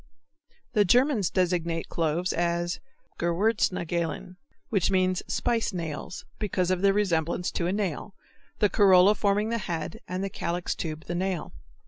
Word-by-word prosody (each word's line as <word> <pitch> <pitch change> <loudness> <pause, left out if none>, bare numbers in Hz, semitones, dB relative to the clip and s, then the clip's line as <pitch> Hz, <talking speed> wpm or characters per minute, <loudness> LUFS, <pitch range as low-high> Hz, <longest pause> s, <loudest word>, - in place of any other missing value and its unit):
The 210 -3 +5
Germans 240 - +3
designate 170 -3 0
cloves 165 +2 -1
as 175 0 -1 0.4
Gewürznägelein, 175 -2 0 0.3
which 195 -5 +2
means 185 -1 +2
spice 230 -3 0
nails, 165 -1 -5
because 185 -4 0
of 185 -1 0
their 200 0 +5
resemblance 175 -4 0
to 170 - -1
a - - 0
nail, 195 -1 -3 0.4
the 210 - +4
corolla 195 0 +6
forming 210 +1 +1
the 230 0 -1
head 165 -4 -4
and 185 +2 -3
the 195 - -2
calyx 175 +1 -2
tube 155 -1 -5
the - - -4
nail. 185 -1 -2
180 Hz, 140 wpm, -27 LUFS, 170-200 Hz, 0.4 s, corolla